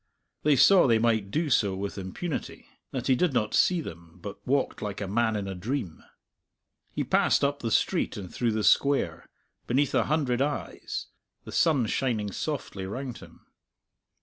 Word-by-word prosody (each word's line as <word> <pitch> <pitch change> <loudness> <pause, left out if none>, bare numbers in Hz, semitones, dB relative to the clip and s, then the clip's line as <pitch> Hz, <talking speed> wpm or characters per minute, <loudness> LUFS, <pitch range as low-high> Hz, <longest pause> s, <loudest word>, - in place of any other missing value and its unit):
They 150 -1 +4
saw 175 +5 +6
they 115 -2 +4
might 110 -3 +1
do 155 +6 -1
so 100 -5 +3
with 100 +1 -4
impunity; 115 - -5 0.2
that - - -4
he 130 - +4
did 170 +2 +1
not 110 -3 0
see 180 -2 +3
them, 85 - -10
but 100 +6 -9
walked 135 +1 0
like 100 -2 -4
a 100 - -3
man 110 +2 +1
in 100 -2 -3
a 95 - -3
dream. 100 - -4 0.9
He - - -2
passed - - +2
up 140 0 +1
the 115 - -2
street - - +1
and 95 -4 -8
through 120 -2 0
the 110 0 -1
Square, 140 +6 +2 0.4
beneath 135 +2 +1
a - - +3
hundred 135 -5 0
eyes, 145 0 -3 0.4
the - - -9
sun 145 -8 +3
shining 110 -3 -1
softly 100 -8 -4
round 125 +4 -5
him. - - -16
120 Hz, 175 wpm, -27 LUFS, 100-140 Hz, 0.9 s, saw